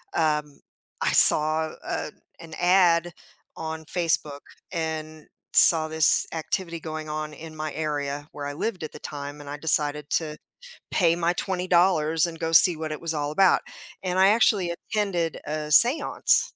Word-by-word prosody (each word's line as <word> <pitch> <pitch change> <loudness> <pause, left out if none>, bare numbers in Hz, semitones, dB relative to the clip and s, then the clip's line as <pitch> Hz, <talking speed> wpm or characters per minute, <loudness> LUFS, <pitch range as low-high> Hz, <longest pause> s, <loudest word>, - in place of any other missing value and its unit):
um, 150 -2 -1 0.4
I - - +1
saw, 155 +1 +4
uh, 150 - -4 0.3
an 165 -1 -12
ad 175 -1 +3 0.5
on 160 0 -6
Facebook 155 -4 -1 0.3
and 155 -2 -5 0.3
saw 160 -2 +5
this 160 -1 +3
activity 170 +1 -3
going 155 -1 -6
on 155 0 -4
in 160 +1 -11
my 155 0 -5
area 145 -1 -4
where 145 -1 -6
I 145 - -4
lived 185 +2 -4
at 155 - -6
the - - -11
time 145 0 -7
and 145 -1 -10
I 145 - -6
decided 150 -1 0
to 155 -2 -1 0.5
pay 170 -2 +2
my 170 0 0
$20 180 -4 +1
and 165 -1 -7
go 165 0 -2
see 165 +1 +6
what 155 -1 -5
it - - -8
was 165 -1 -3
all 150 -1 -2
about 190 +3 +4 0.4
and 185 -1 -2
I 190 +1 +5
actually 205 -5 +2
attended 175 -3 -3
a 150 0 -4
seance. 245 - +4
160 Hz, 160 wpm, -25 LUFS, 150-175 Hz, 0.5 s, see